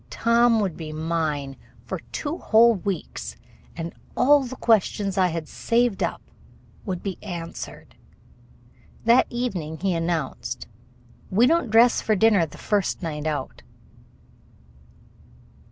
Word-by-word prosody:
Tom 235 0 +3
would 190 -6 -1
be 155 -2 -7
mine 155 -3 -2 0.3
for - - -4
two 310 +3 -3
whole 230 +2 +5
weeks, 195 -3 -4 0.4
and 165 0 -5 0.2
all 290 +2 +5
the 260 -1 -6
questions 205 -4 +1
I 185 -1 +3
had 165 -2 -4
saved 235 -3 0
up - - -2 0.6
would 185 -2 -3
be 195 -3 -4
answered. 170 -4 -7 1.1
That 235 +3 +5
evening 190 -11 -3
he 190 +2 0
announced: 165 -7 -3 0.6
"We 215 +6 +4
don't 325 -2 +2
dress 230 +2 +5
for 215 - +1
dinner 200 -4 +4
the - - -13
first 205 -3 -1
night 155 -2 -3
out." 150 -2 -4
195 Hz, 120 wpm, -24 LUFS, 165-230 Hz, 1.1 s, whole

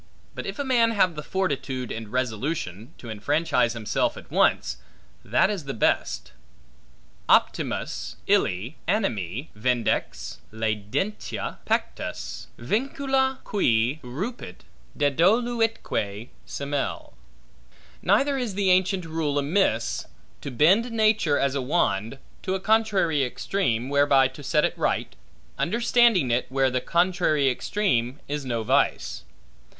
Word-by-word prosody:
But - - -6
if - - -5
a 285 - -1
man 245 -4 +3
have 185 -5 +3
the 150 - -6
fortitude, 140 - -2
and 115 -1 -5
resolution, 120 - -3
to 115 - -8
enfranchise 120 +2 +1
himself 115 -3 -1
at - - -12
once, - - +2 0.5
that 195 - +2
is 190 -8 -4
the 135 - -4
best: 110 - 0 1.0
Optimus - - +1
ille 100 - +1
animi 120 - -1
vindex 110 - -1
laedentia 110 - -3
pectus - - -3
Vincula 265 - 0
qui 125 - +1
rupit, 130 - -6 0.3
dedoluitque 180 - +1 0.2
semel. 140 0 -3 0.9
Neither 270 +8 +2
is 230 -6 -3
the 195 -2 +2
ancient 185 0 +2
rule 160 -3 -1
amiss, 140 - +1 0.3
to - - -5
bend 185 - +3
nature, 215 -9 +3
as 140 -1 +1
a 140 - -1
wand, 125 - 0 0.2
to 190 - -1
a - - -2
contrary 200 -8 +2
extreme, 125 - -1
whereby 140 -1 +4
to 135 +3 -12
set 150 +2 +2
it - - -2
right, - - -1 0.4
understanding 230 - +3
it, 120 +2 +1
where 135 0 +2
the 125 0 0
contrary 170 -4 +2
extreme 130 - 0
is 145 0 -3
no 120 -3 -2
vice. - - 0
145 Hz, 120 wpm, -25 LUFS, 120-200 Hz, 1.0 s, whereby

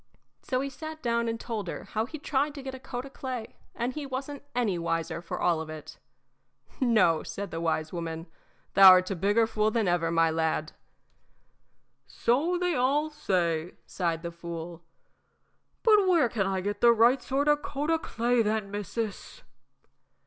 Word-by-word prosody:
So 255 -1 -1
he 275 - -3
sat 315 +3 -8
down 235 -1 +1
and 230 0 -2
told 220 -6 -4
her - - -5
how 220 +1 -2
he'd 310 +1 -9
tried 285 +1 0
to 280 - -8
get 265 0 -6
a 260 - -8
coat 250 -1 -6
o' - - -9
clay, 255 -5 -6 0.2
and 240 +2 -2
he 295 -1 -5
wasn't 270 +2 -5
any 215 -8 0
wiser 165 0 -2
for 170 - -5
all 170 -2 +2
of 160 - -7
it. 155 -2 -9 0.8
"No," 215 -11 +3
said 200 0 -6
the 165 - -4
wise 160 -1 -1
woman, 165 -1 -4 0.5
"thou 190 -1 +10
'rt 185 +1 +1
a - - -1
bigger 205 +6 +2
fool 215 -1 +1
than 220 -2 0
ever, 175 -2 +1
my 165 -1 +3
lad." 160 -1 -1 1.4
"So 305 +10 +1
they 360 0 0
all 290 +3 +1
say," 175 - -1
sighed 170 -2 -2
the 170 - -4
fool; 170 0 -7 1.0
"but 425 -4 +5
where 335 -9 +4
can 200 -5 -1
I 190 -1 -1
get 205 +2 -3
the 235 - +7
right 235 +4 +4
sort 275 +2 -1
of 295 0 +3
coat 295 +2 -2
o' 325 - +2
clay, 240 -3 +1
then, 215 -2 -1
missis?" 210 - -5
220 Hz, 180 wpm, -28 LUFS, 170-265 Hz, 1.4 s, thou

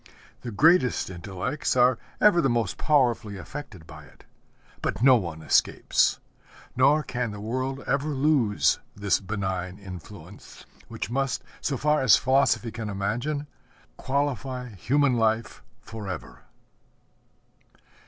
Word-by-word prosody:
The 120 - -6
greatest 130 - +3
intellects 95 - -3
are 125 -1 +4 0.2
ever 190 -5 +5
the 135 - +2
most 115 -5 -1
powerfully 120 -8 +1
affected 95 - -9
by 75 -2 -12
it; - - -20 0.6
but - - -2
no 130 -1 +8
one 85 -8 -3
escapes. - - +2 0.6
Nor 140 +4 +4
can 125 -3 -3
the 105 -1 -7
world 130 +5 -3
ever 140 +2 0
lose 135 -7 +2 0.2
this 100 -1 +1
benign 95 -2 -4
influence, 90 -5 -12 0.2
which - - -6
must, 135 +1 -1 0.2
so 140 - -1
far 150 +3 +2
as 130 -4 +6
philosophy 130 -3 +2
can 110 -1 -5
imagine, 120 +10 -2 0.5
qualify 130 -2 -2
human 130 - +1
life 110 0 0 0.2
forever. 105 -4 -8
120 Hz, 120 wpm, -26 LUFS, 100-135 Hz, 0.6 s, no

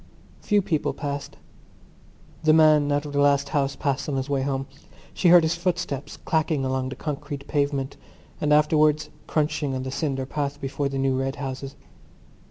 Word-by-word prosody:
Few 205 -2 +2
people 165 -6 0
passed. 145 0 -5 1.1
The 155 0 +5
man 155 -2 +5
out 145 +1 0
of 145 - -7
the 140 - +1
last 140 -1 +3
house 140 -2 0
passed 140 0 -2
on 140 - -1
his 135 +2 -2
way 135 -1 +1
home; 135 0 -1 0.5
she 180 - +1
heard 175 -1 +8
his 160 +1 +2
footsteps 170 -5 -3
clacking 155 -4 0
along 130 0 -1
the 130 - -6
concrete 145 -2 -5
pavement 140 -2 -1 0.4
and 150 - +1
afterwards 150 0 +3 0.2
crunching 150 -3 0
on 130 - -3
the 130 - -4
cinder 135 -2 -2
path 145 +1 -3
before 140 0 -2
the 135 - -4
new 135 -1 +1
red 135 +1 -2
houses. 135 -1 -6
145 Hz, 175 wpm, -25 LUFS, 135-155 Hz, 1.1 s, heard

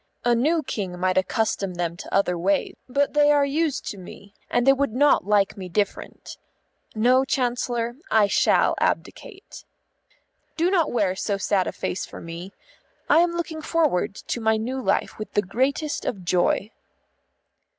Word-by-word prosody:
A 240 - +4
new 305 +7 +1
King 185 -8 -4
might 185 0 +2
accustom 195 -2 -1
them 170 -1 -2
to - - -9
other 195 -2 +2
ways, 190 +3 0 0.2
but 280 +3 +1
they 295 0 +5
are 290 -1 +4
used 295 0 -1
to 200 - -7
me, 195 +2 -12 0.2
and 245 0 +1
they 270 - +7
would 275 -4 -1
not 285 -5 +3
like 205 -2 +2
me 185 -2 -8
different. 200 +3 -3 0.6
No, 250 +4 +4
Chancellor, 245 -2 -1
I 215 -2 +4
shall 200 - +3
abdicate. 400 -4 -4 0.9
Do 340 +3 +2
not 340 -5 +2
wear 200 -6 +1
so 200 +1 -2
sad 195 -1 0
a - - -2
face 185 - -4
for - - -10
me. 170 +3 -8 0.6
I - - +7
am 345 0 +2
looking 330 -2 -4
forward 310 - 0
to 235 - -5
my 220 0 +2
new 255 +4 -3
life - - -1
with 215 - -7
the 205 - +2
greatest 270 - -1
of 190 -6 -4
joy." 180 +4 +1
230 Hz, 165 wpm, -24 LUFS, 195-280 Hz, 0.9 s, they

